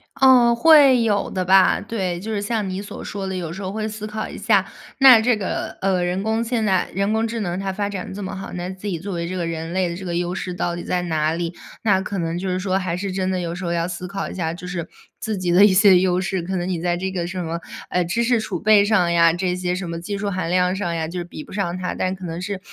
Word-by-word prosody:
哦， 255 -3 +6
会 280 -2 +6
有 210 -3 +1
的 185 -1 -2
吧， 190 +1 +5
对。 190 -5 -3
就 220 +4 -5
是 205 - -1
像 210 -1 -2
你 185 +1 -4
所 205 - -8
说 200 -1 -5
的， 190 - -3
有 170 -3 -4
时 190 - -7
候 190 - -4
会 215 +1 -3
思 215 0 -6
考 215 0 -4
一 - - -9
下 200 -2 +2 0.3
那 260 -4 +8
这 235 -1 +2
个， 195 - -4
呃， 190 -2 +1
人 180 +2 -1
工 220 +1 0
现 230 -1 -1
在 190 -3 +1
人 200 +3 0
工 220 +1 +1
智 230 +1 -4
能 180 -4 -2
它 195 0 -2
发 200 +1 -2
展 190 -2 -6
这 205 - -6
么 190 - -5
好， 195 - -7
那 180 0 -4
自 190 +2 -8
己 170 -5 -2
作 195 +2 -5
为 170 -1 -3
这 185 - -4
个 175 - -1
人 165 0 -4
类 185 0 +1
的 170 - -4
这 190 - -8
个 175 -1 -3
优 175 +1 -2
势 180 - -4
到 175 -1 -2
底 175 - -6
在 180 -1 -1
哪 155 -3 0
里？ 170 0 -3 0.3
那 195 -4 +3
可 200 0 -4
能 165 -1 -2
就 185 +1 -3
是 185 - -1
说 185 0 0
还 185 -2 -2
是 195 0 -3
真 190 0 -1
的 185 - -1
有 170 -1 -3
时 180 - -7
候 170 - -2
要 170 0 0
思 180 0 -6
考 195 +1 -4
一 - - -7
下， 165 -3 -2
就 180 +1 -9
是 175 -2 -4 0.3
自 220 -3 -3
己 180 -1 -1
的 180 +3 +6
一 205 - +8
些 195 -1 +7
优 180 -1 +2
势， 190 -1 -2
可 185 +3 -3
能 175 0 -2
你 180 -3 -2
在 175 0 0
这 190 +1 -3
个 175 -2 -2
什 185 +1 -4
么， 165 +1 -4 0.3
呃， 180 - +1
知 205 +8 0
识 235 -1 +2
储 200 -5 -4
备 210 +1 +5
上 190 -5 +2
呀 170 -1 +5
这 180 +1 -1
些， 180 0 -2
什 180 -2 -5
么 165 0 -4
技 200 +4 -4
术 200 0 -2
含 185 -3 -2
量 180 +1 +2
上 180 -4 -2
呀， 160 -1 -2
就 175 +3 -6
是 175 - -3
比 170 -3 -9
不 - - -13
上 185 -3 -2
它。 185 0 -3
但 185 - -1
可 190 -1 -8
能 165 +1 -5
是 195 +1 -4
185 Hz, 315 characters per minute, -22 LUFS, 175-205 Hz, 0.3 s, 那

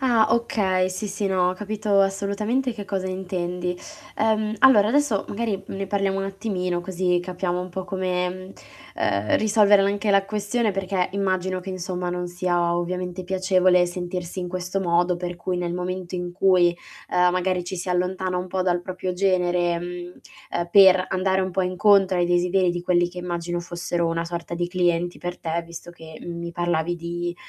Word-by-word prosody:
Ah, 235 -5 +4
okay. 195 -5 +1
Sì, 195 +3 -4
sì, 200 0 -2
no, 180 -1 +2
ho - - -2
capito 210 +1 0
assolutamente 205 +6 0
che 210 -3 -7
cosa 190 -2 -3
intendi. 180 -1 -3 0.4
Ehm, 215 0 +1
allora, 215 -5 +6
adesso, 270 -6 +2
magari, 205 -3 -2
ne 195 0 -4
parliamo 195 0 0
un 195 - -1
attimino 190 -3 -2
così 180 -1 0
capiamo 180 0 -2
un 180 - -5
po' 185 +1 -5
come, 180 -1 -1
ehm, 185 +1 -7 0.8
uhm, - - +4
risolvere 210 -2 +5
anche 205 +1 0
la 195 0 +4
questione 210 +2 -1
perché 190 -1 -1
immagino 185 -2 -1
che, 190 - -7
insomma, 180 -1 -3
non 180 0 -3
sia 175 -1 0
ovviamente 180 +1 -3
piacevole 185 -1 +3
sentirsi 175 0 -5
in 180 - -4
questo 185 +1 -3
modo 175 0 +2
per 175 0 -5
cui 180 +1 -3
nel 175 -1 -2
momento 180 0 -4
in 175 0 -4
cui, 180 -2 +3 0.3
ehm, 180 0 +4
magari 180 0 0
ci 185 +1 -5
si 180 +1 -5
allontana 180 +1 -1
un 180 0 -3
po' 185 +1 -1
dal 175 -1 +1
proprio 185 0 -4
genere, 180 -2 +1
mhmm, 175 0 -7 0.3
ehm, 175 0 -1
per 190 -2 +7
andare 190 0 +1
un 185 0 -1
po' 190 - +1
incontro 190 0 +3
ai 175 - +2
desideri 175 +1 +2
di 175 0 -4
quelli 175 -1 +2
che 180 0 -10
immagino 175 -1 -3
fossero 175 0 -2
una 165 0 -1
sorta 170 0 -5
di 175 0 -1
clienti 175 -1 0
per 175 0 -5
te, 165 0 -2
visto 170 +1 -10
che, 160 -2 -12
mhmm, 170 -1 -6
mi 170 0 -5
parlavi 175 0 0
di, 175 +1 -4
180 Hz, 185 wpm, -24 LUFS, 175-195 Hz, 0.8 s, per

